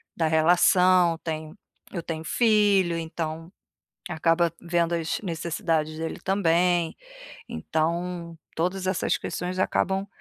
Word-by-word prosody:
da 165 - +1
relação, 175 +2 +4
tenho 155 +1 -5 0.4
eu 170 - -3
tenho 160 -1 -5
filho 205 -5 +3
então, 165 +1 -5 0.5
acaba 165 0 +1
vendo 170 0 0
as 165 -1 -1
necessidades 165 -3 -2
dele 160 0 -4
também. 175 -3 +2 0.5
Então 170 +1 -2 0.2
todas 185 +3 -1
essas 185 - +1
questões 180 +1 -4
acabam 190 +1 0
170 Hz, 105 wpm, -25 LUFS, 165-180 Hz, 0.5 s, relação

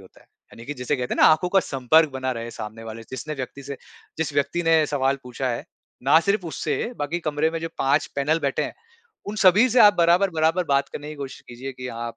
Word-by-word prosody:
होता 95 - -18
है। - - -24 0.3
यानि 115 - -12
कि 145 - -4
जैसे 125 +3 -2
कहते 125 -1 -3
हैं - - -2
ना - - +8
आँखों 155 +3 +3
का 195 +1 +4
संपर्क 145 +3 +2
बना 130 -1 -2
रहे 115 -1 -5
हैं 115 - -6
सामने 110 0 -8
वाले 115 0 -8
जिस 130 +2 -6
ने 155 - -2
व्यक्ति 135 +1 -7
से 140 +1 -7 0.4
जिस 160 -2 -1
व्यक्ति 145 +5 0
ने 165 -1 +4
सवाल 135 -1 0
पूछा 125 +1 -4
है 120 - -3 0.4
ना 140 +5 +6
सिर्फ़ 200 0 0
उससे 160 - -2 0.2
बाकी 145 +4 -2
कमरे 155 0 0
में 165 - -3
जो 165 - -3
5 140 +3 +2
पैनल 150 +4 +1
बैठे - - 0
हैं - - -6 0.5
उन 210 +1 -5
सभी 205 +7 +6
से 245 0 +4
आप 205 -1 +8
बराबर-बराबर 170 0 +3
बात 140 0 +2
करने 150 +1 -7
की 155 - -7
कोशिश 135 -2 -7
कीजिए 130 +3 -7
कि 125 0 -8
आप 115 -1 -6
145 Hz, 240 wpm, -23 LUFS, 130-165 Hz, 0.5 s, ना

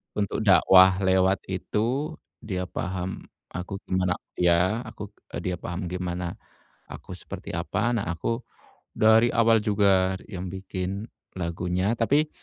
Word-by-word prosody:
Untuk 105 +1 -1
dakwah 95 -1 +6
lewat 95 0 +3
itu, 115 +9 -1 0.2
dia 90 -4 -4
paham, 95 0 -4 0.2
aku 90 +3 -6
gimana 90 -1 0 0.2
ya, 90 +6 +2
aku - - -8 0.2
eee, - - -3
dia 90 - -2
paham 85 +1 -5
gimana, 90 -1 -4 0.5
aku - - -9
seperti - - -8
apa, 120 - -1
nah 100 - -2
aku, 115 +8 -3 0.5
dari 110 +2 +5
awal 115 -1 +5
juga 100 -3 +3 0.2
yang 95 -3 -5
bikin 95 +3 -4 0.3
lagunya, 90 +3 -1
tapi, 145 +7 +2
95 Hz, 125 wpm, -26 LUFS, 90-110 Hz, 0.5 s, dakwah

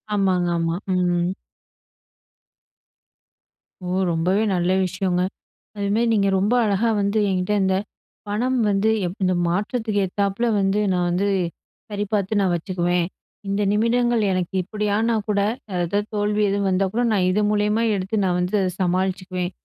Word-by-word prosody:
ஆமாங்க, 185 -3 +1
ஆமா. 165 0 0 0.2
ம். 175 0 +1 2.5
ஓ! - - -4 0.2
ரொம்பவே 180 +5 +1
நல்ல 175 +1 +1
விஷயங்க. 180 0 -1 0.6
அது 200 -1 -2
மாரி 235 +1 +2
நீங்க 200 -2 +2
ரொம்ப 200 +4 +1
அழகா 210 +2 +1
வந்து, 200 +2 +1
என்கிட்ட 185 +1 0
இந்த 190 0 +2 0.5
பணம் 245 +5 0
வந்து 200 +2 +2 0.2
எப் 175 - -4
இந்த 185 0 +2
மாற்றத்துக்கு 210 +3 -1
ஏத்தப்பல 200 +4 -1
வந்து 195 +2 +1
நான் 180 -1 +1
வந்து 185 +3 0 0.6
சரிபார்த்து 205 0 -1
நான் 190 -2 +2
வச்சுக்குவேன். 175 0 0 0.4
இந்த 200 +1 0
நிமிடங்கள் 235 +1 +2
எனக்கு 185 0 -2
இப்டியானா 210 +3 0
கூட 205 -1 +1 0.4
ஏதாவது 175 +4 0 0.2
தோல்வி 210 0 0
எதுவும் 200 0 0
வந்தா 190 +1 +2
கூட 240 - 0
நான் 190 -3 +2
இது 205 - +1
மூலியமா 210 +2 +1
எடுத்து 200 +2 -1
நான் 180 -1 +1
வந்து 180 +4 -2
அத 185 -1 0
சமாளிச்சிக்குவேன். 185 0 -1
195 Hz, 135 wpm, -22 LUFS, 180-210 Hz, 2.5 s, மாரி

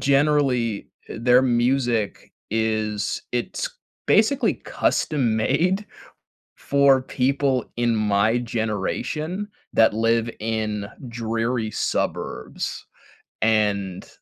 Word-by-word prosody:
generally, 135 -6 +2 0.2
eh, - - -7
their 125 +2 +5
music 120 -3 0 0.2
is 110 -1 -1
it's 120 - -2 0.4
basically 220 +6 +3
custom 125 -8 0
made 180 - +1 0.7
for 140 -2 +3
people 135 -1 0
in 120 -1 +2
my 105 +2 +2
generation, 120 - -2 0.3
that 110 -1 +5
live 115 +1 +2
in 110 -2 -2 0.2
dreary 115 0 -2
suburbs. - - -3 0.6
And 100 -4 +1
115 Hz, 85 wpm, -23 LUFS, 110-135 Hz, 0.7 s, their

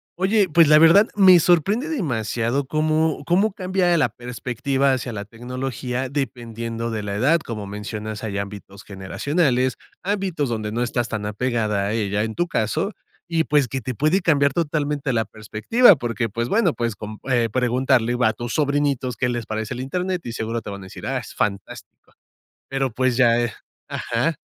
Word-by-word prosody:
Oye, 195 +1 +2
pues, 165 +1 +5
la 150 +1 +7
verdad, 170 +7 +7
me 190 -3 +7
sorprende 195 - +2
demasiado 125 - -1
cómo 155 +2 0
cómo 190 +5 +2
cambia 185 -3 +1
la 150 -6 +2
perspectiva 125 +3 -1
hacia 130 -2 -2
la 100 -2 -4
tecnología, 125 +3 -4
dependiendo 115 -4 -4
de 110 -2 -3
la 100 0 -3
edad. 140 +11 +3
Como 110 -8 -6
mencionas, 105 +1 -6
hay 100 -3 -3
ámbitos 100 0 -8
generacionales, 125 - 0 0.3
ámbitos 185 -8 -1
donde 110 -2 -3
no 115 +2 -2
estás 120 -1 -1
tan 105 -2 -3
apegada 105 -2 -1
a 100 - -1
ella 105 -2 0
en 110 0 -3
tu 175 - 0
caso, 110 - -1 0.4
y, 165 -1 +1
pues, 145 -4 +2
que 130 +3 -3
te 130 +2 -4
puede 155 - +2
cambiar 140 -5 +3
totalmente 150 -3 -1
la 115 -1 +2
perspectiva, 110 - +3
porque, 120 -3 -2
pues, 115 +3 -3
bueno, 205 -7 +2
pues, 115 -2 -2
con 105 0 -8
eh, 120 -2 +3
preguntarle 125 -1 +2
a 110 -2 +3
tus 120 +2 -5
sobrinitos 140 -4 0
qué 125 - 0
les 120 -2 -3
parece 110 0 -4
el - - -7
Internet, 180 +7 -2
seguro 115 0 -3
te 105 - -7
van 100 0 -7
a - - -10
decir: - - -10
"Ah, - - -1
es - - -10
fantástico". 100 +1 -4 0.6
Pero, 135 -2 -1
pues, 130 +1 +1
ya, 120 -2 +4
eh 120 -2 -2 0.4
Ajá. - - -1
125 Hz, 175 wpm, -22 LUFS, 110-155 Hz, 0.6 s, la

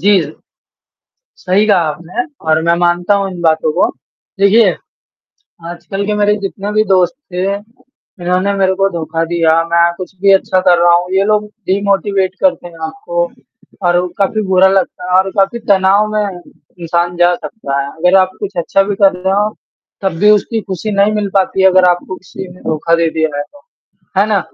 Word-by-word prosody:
जी। 200 -1 +4 1.2
सही 200 +4 +2
कहा 205 - +4
आपने 170 +10 -5 0.2
और 155 0 +3
मैं 170 0 +2
मानता 175 +3 +1
हूँ 195 -1 -1
इन 175 - -8
बातों 160 -1 +1
को। - - +2 0.5
देखिए, 210 +3 +5 1.0
आजकल 195 +3 -5
के 210 - -1
मेरे 210 0 +2
जितने 200 +1 -4
भी 215 +1 +2
दोस्त 185 +1 +2 0.2
थे, 190 +2 -1
उन्होंने 200 -5 -5
मेरे 190 -1 +1
को 195 +1 +1
धोखा 165 -1 -3
दिया। 165 -1 +1 0.2
मैं 170 0 +4
कुछ 185 +1 -8
भी 195 -1 +5
अच्छा 190 -1 +2
कर 180 -2 +3
रहा 175 0 +5
हूँ। 180 +1 -2
ये 195 +1 +3
लोग 210 0 +1 0.2
डिमोटिवेट 195 -1 0
करते 270 -10 +1
हैं 165 - -15
आपको 170 +2 -3 0.6
और 175 0 +3
वो 180 - 0
काफ़ी 215 +2 0
बुरा 190 0 +5
लगता 190 -1 -1
है 185 - +5
और 190 0 +1
काफ़ी 195 +4 +2
तनाव 195 +2 +4
में 210 - +1 0.6
इंसान 170 +1 -1
जा 175 0 +3
सकता 140 -9 -4
है। 140 - -3
अगर 180 +4 +2
आप 185 0 +2
कुछ 205 -2 -5
अच्छा 195 +3 +2
भी 200 +1 -2
कर 195 -1 +4
रहे 190 +1 -1
हो, 210 +1 0 0.5
तब 190 -2 0
भी 210 - +5
उसकी 215 +2 +1
खुशी 195 +2 -5
नहीं 200 +1 +2
मिल 210 -1 -1
पाती 190 0 +1
है 190 - +7
अगर 185 0 +4
आपको 175 +1 -3
किसी 185 0 -10
ने 180 - -17
धोखा 160 +2 0
दे 165 0 +1
दिया 160 -2 -1
है 145 - -1
तो, 290 - -17 0.6
है 200 - +4
ना? 210 -2 +2
190 Hz, 190 wpm, -14 LUFS, 175-200 Hz, 1.2 s, है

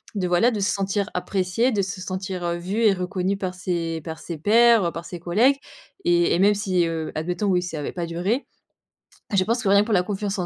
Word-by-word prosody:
de, 185 -3 -1
voilà, 180 +8 +3
de 215 - -3
se 200 - +1
sentir 195 +1 -1
appréciée, 190 +6 0
de 210 -4 +1
se 195 +1 -4
sentir, 185 -1 -4
heu, 170 0 -1
vue 190 +6 -2
et 210 -3 +5
reconnue 185 +1 -2
par 185 -2 -4
ses 170 -2 -3
par 160 +1 -7
ses 165 +1 -6
pairs, 225 +4 +5
heu, 170 - 0
par 170 +1 -7
ses 175 - -7
collègues». 220 +11 +3 0.5
Et 175 -1 +3
et - - 0
même 200 +2 +5
si, 185 -4 +1
heu, 160 -1 -3
admettons, 175 +6 -2
oui, 180 -2 +2
si 180 - -5
ça 160 - -5
avait 145 - -4
pas 175 -2 -4
duré, 180 - -1 0.9
je 190 - +4
pense 235 +3 0
que, 200 - +1
rien 200 +1 +6
que - - -1
pour 225 - -1
la 180 - +3
confiance 205 +1 -3
en 180 - -1
185 Hz, 245 wpm, -23 LUFS, 175-205 Hz, 0.9 s, rien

